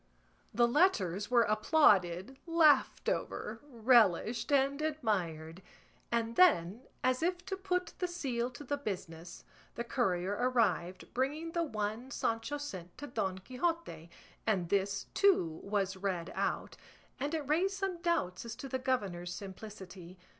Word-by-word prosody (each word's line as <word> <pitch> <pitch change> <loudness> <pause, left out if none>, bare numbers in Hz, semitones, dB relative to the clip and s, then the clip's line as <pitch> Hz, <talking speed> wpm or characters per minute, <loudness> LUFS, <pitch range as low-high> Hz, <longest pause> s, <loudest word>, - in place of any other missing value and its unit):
The 240 0 +3
letters 215 - +2
were 240 -1 +5
applauded, 215 - +3
laughed 315 -4 +4
over, - - -2
relished, 230 - +3
and 280 +1 +2
admired; 190 - -2 0.5
and 230 0 0
then, 230 - +4 0.2
as 255 +1 +2
if 355 +1 -1
to 385 - -3
put 365 -2 -2
the 360 - 0
seal 260 -9 -2
to 255 +3 -10
the 285 +1 -2
business, 175 - -6 0.3
the 235 - -3
courier 195 -7 0
arrived, 215 -6 0
bringing 295 +6 -1
the 340 - 0
one 220 -3 -3
Sancho 230 +2 -2
sent 185 -12 -7
to 290 - -6
Don 205 -8 -2
Quixote, 255 - -3 0.4
and 185 -6 +1
this, 195 0 0
too, 175 - +3
was 195 -1 -1
read 185 -3 -3
out, - - -2 0.4
and 290 +3 -1
it 300 -4 -3
raised 370 +6 +1
some 385 -3 -3
doubts 340 - 0
as 230 -1 -6
to 270 - -7
the 260 0 -2
governor's 195 -10 -2
simplicity. 190 -1 -9
235 Hz, 140 wpm, -33 LUFS, 190-290 Hz, 0.5 s, were